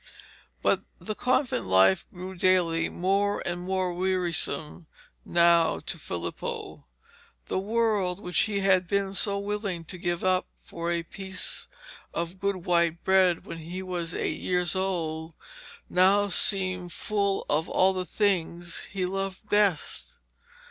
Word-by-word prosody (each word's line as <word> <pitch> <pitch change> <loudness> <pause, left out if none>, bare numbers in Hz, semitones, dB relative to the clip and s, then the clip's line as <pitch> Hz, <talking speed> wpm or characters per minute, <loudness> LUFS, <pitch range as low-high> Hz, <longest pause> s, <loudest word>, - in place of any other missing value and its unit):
But - - +3 0.2
the 215 - -5
convent 255 - 0
life 95 0 +4
grew 185 +1 -7
daily 175 -3 +2
more 200 +3 0
and 175 0 -2
more 185 0 -1
wearisome 175 -3 0 0.4
now 170 -1 +4
to 170 - -3
Filippo. 85 - -5 0.6
The - - -1
world, 205 -3 0
which 180 -4 -1
he 205 -2 +1
had 185 -2 +3
been 200 +1 0
so 200 0 +3
willing 200 -3 -3
to 180 +3 -6
give 175 -1 -2
up 185 0 +2 0.2
for 170 0 -5
a 170 -1 -1
piece 190 +2 -4 0.5
of 170 +2 -3
good 195 -2 -2
white 170 -1 +2
bread 185 -3 +3
when 165 - -7
he 175 +4 -6
was 175 -2 -3
eight - - -2
years 180 0 0
old, 165 -4 -2 0.5
now 195 +3 +4
seemed 185 -2 +2
full 200 0 -1
of 155 +2 0
all 190 +1 +3
the 185 -1 -2
things 175 -3 -1
he 190 -1 -2
loved 195 +2 -4
best. 205 -6 +1
185 Hz, 135 wpm, -27 LUFS, 170-195 Hz, 0.6 s, life